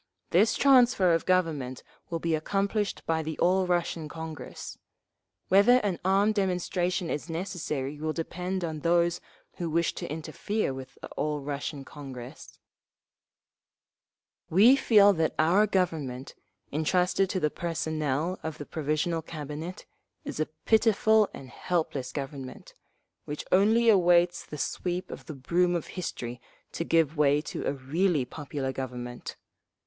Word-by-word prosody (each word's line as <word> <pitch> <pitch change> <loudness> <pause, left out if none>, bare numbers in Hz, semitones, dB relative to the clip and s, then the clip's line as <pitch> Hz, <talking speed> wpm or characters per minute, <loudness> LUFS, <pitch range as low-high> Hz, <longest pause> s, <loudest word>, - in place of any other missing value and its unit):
This 205 +6 +4
transfer 250 -9 +5
of 165 - 0
government 155 -9 0 0.3
will 170 - -1
be 165 0 -1
accomplished 200 +6 -1
by 160 -1 +1
the 160 0 -5
All 185 +1 +2
Russian 170 -3 -1
Congress. 160 -4 -8 0.7
Whether 205 +6 +6
an 195 -4 -1
armed 195 +3 +3
demonstration 180 -2 -1
is 150 +3 -4
necessary 160 -5 -3
will 155 +1 -1
depend 180 +3 -3
on… 160 -2 -3
those 170 +1 +2 0.4
who 170 -2 -3
wish 170 +1 +1
to - - -6
interfere 160 +3 -2
with 130 0 -9
the - - -5
All 150 -1 -2
Russian 140 0 -4
Congress…. 130 -5 -10 1.9
"We 215 +10 +7
feel 205 -6 +6
that 160 -3 0
our 180 +7 +4
Government, 155 -10 -1 0.4
entrusted 180 +5 +1
to 185 - -1
the 150 -3 +1
personnel 160 0 -2
of 160 -1 -5
the 145 - -7
Provisional 155 +3 -1
Cabinet, 155 +3 -7 0.4
is - - -5
a 155 - +1 0.2
pitiful 220 -1 +4
and 135 - -10
helpless 140 -2 -2
Government, 135 -2 -7 0.5
which 150 0 -5
only 220 +5 +4
awaits 175 -4 +4
the 150 - -7
sweep 180 +4 -3
of - - -9
the 155 - -6
broom 175 +7 +1
of 170 - -2
History 125 -9 -5 0.3
to - - -3
give 165 -2 +2
way 145 -1 +4
to - - -5
a - - +1
really 145 +2 0
popular 140 0 -4
Government. 125 -2 -6
165 Hz, 135 wpm, -28 LUFS, 150-185 Hz, 1.9 s, We